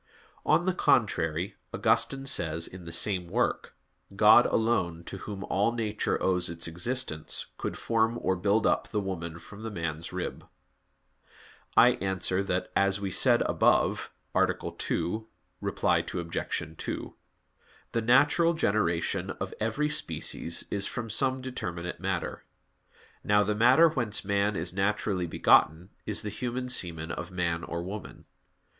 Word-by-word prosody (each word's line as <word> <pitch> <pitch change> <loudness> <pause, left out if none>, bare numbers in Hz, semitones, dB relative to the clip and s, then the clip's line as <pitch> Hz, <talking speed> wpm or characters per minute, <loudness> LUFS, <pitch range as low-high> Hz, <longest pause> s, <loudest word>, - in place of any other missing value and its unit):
On 175 - +4
the 185 - +2
contrary, 90 - +1
Augustine 135 0 +1
says, 85 -9 0
in 90 -1 -9
the 85 - -7
same 90 +1 0
work: - - -1 0.4
"God - - +7
alone, 95 -8 0
to 95 - -7
Whom 100 +1 -6
all 105 +4 +1
nature 110 -3 -1
owes 90 -2 +1
its 85 0 -4
existence, 85 0 -2
could - - -3
form 115 0 +1
or 95 - +1
build 100 +4 +1
up - - +2
the 105 - -2
woman 85 -4 -4
from 100 +5 -12
the 115 - -4
man's 85 -4 -4
rib." 90 0 -5 1.3
I 120 - +9
answer 95 0 0
that, 95 -2 -2
As 100 0 +2
was 100 -2 -3
said - - +4
above - - +2 0.2
(A. - - +4 0.3
2, 110 +5 -2 0.4
ad - - +1 0.5
2), 80 0 -5 0.8
the 115 - 0
natural 145 +8 +4
generation 95 - 0
of 95 0 -5
every 125 +8 0
species 85 - -2
is 100 -1 0
from 115 -2 -4
some 130 +3 +1
determinate 90 -10 -5
matter. 95 -1 -3 0.8
Now 105 0 +4
the 105 +1 0
matter 125 +9 +6
whence 120 -10 -2
man 100 +1 +1
is 85 +1 -3
naturally 100 -2 0
begotten 80 +3 +3 0.2
is 105 - -2
the 105 - -3
human 125 +4 -4
semen 85 -7 -1
of 85 - -5
man 85 -2 -1
or 85 0 -4
woman. 100 +3 -8
100 Hz, 140 wpm, -28 LUFS, 85-115 Hz, 1.3 s, I